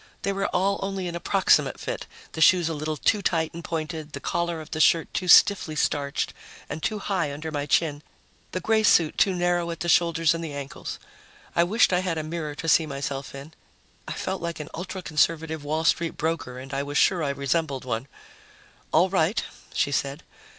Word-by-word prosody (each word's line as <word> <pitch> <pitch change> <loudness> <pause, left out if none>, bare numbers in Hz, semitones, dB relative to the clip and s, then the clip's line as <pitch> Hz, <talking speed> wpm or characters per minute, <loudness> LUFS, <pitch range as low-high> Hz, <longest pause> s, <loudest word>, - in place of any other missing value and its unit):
They 200 - 0
were 195 0 -1
all 195 +2 +1
only 195 -1 -3
an 170 - -5
approximate 185 +3 +2
fit: - - -5 0.2
the 160 - -5
shoes 175 +1 +6
a - - -2
little 155 0 -3
too 210 +7 +2
tight 165 -4 0
and 170 0 -8
pointed, 155 -2 -4
the 140 - -4
collar 170 +2 -2
of 155 - -10
the 155 - -3
shirt 165 +1 +3
too 180 - -2
stiffly 185 -4 +6
starched 140 -2 -1 0.3
and 155 - -6
too 215 - -1
high 185 -7 -1
under 155 +3 -6
my 145 -1 -3
chin, 150 -1 +1 0.5
the 185 - -2
gray 220 +4 +2
suit 165 -7 +4
too 190 -2 +3
narrow 175 -1 +1
at 165 - -6
the 175 - -2
shoulders 165 0 +3
and 165 0 -4
the 155 -3 -5
ankles. 140 -1 -6 0.6
I 170 - +5
wished 205 +1 +3
I 180 - +3
had 180 -3 -2
a 155 - -2
mirror 155 -2 -4
to 165 +2 -6
see 160 0 +4
myself 140 -1 -5
in. 140 +4 -10 0.5
I - - -3
felt 190 0 -3
like 170 -1 -4
an 150 - -6
ultra 185 +2 -6
conservative 160 -1 0
Wall 155 +2 -1
Street 165 +1 +1
broker 160 -6 -2
and 135 +2 -9
I 135 - 0
was 145 +1 -3
sure 180 -4 +3
I 145 - 0
resembled 140 0 -1
one. 120 +1 -3 0.8
"All 170 +4 +5
right," 190 +1 +1 0.3
she 140 - 0
said. 140 +2 -2
160 Hz, 205 wpm, -25 LUFS, 150-175 Hz, 0.8 s, shoes